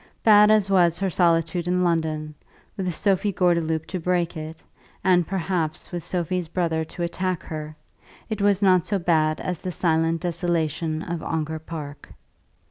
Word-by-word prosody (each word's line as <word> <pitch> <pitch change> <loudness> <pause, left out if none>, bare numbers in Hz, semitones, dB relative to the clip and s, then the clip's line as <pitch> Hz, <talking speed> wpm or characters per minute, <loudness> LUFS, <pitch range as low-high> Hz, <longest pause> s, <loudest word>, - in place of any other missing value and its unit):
Bad 210 -1 +7
as 215 -2 +4
was 175 -3 +4
her 195 0 -1
solitude 170 0 +1
in 180 0 +1
London, 160 -3 -1 0.4
with 185 -2 -2
Sophie 195 +3 +1
Gordeloup 170 -3 +1
to 185 - -4
break 175 0 0
it, 155 0 -8 0.4
and 180 -3 +3
perhaps 175 -4 -2
with 175 -2 -4
Sophie's 180 0 -2
brother 165 -2 -1
to 175 - -6
attack 180 +1 -2
her, 155 -1 -6 0.5
it 215 -2 -4
was 200 0 +2
not 185 -3 +5
so 205 - -1
bad 155 -3 +1
as 180 -3 -3
the 185 - -4
silent 165 -1 +1
desolation 165 -2 -1
of 170 -2 -4
Ongar 160 -1 -3
Park. 150 -3 -8
170 Hz, 155 wpm, -24 LUFS, 160-185 Hz, 0.5 s, Bad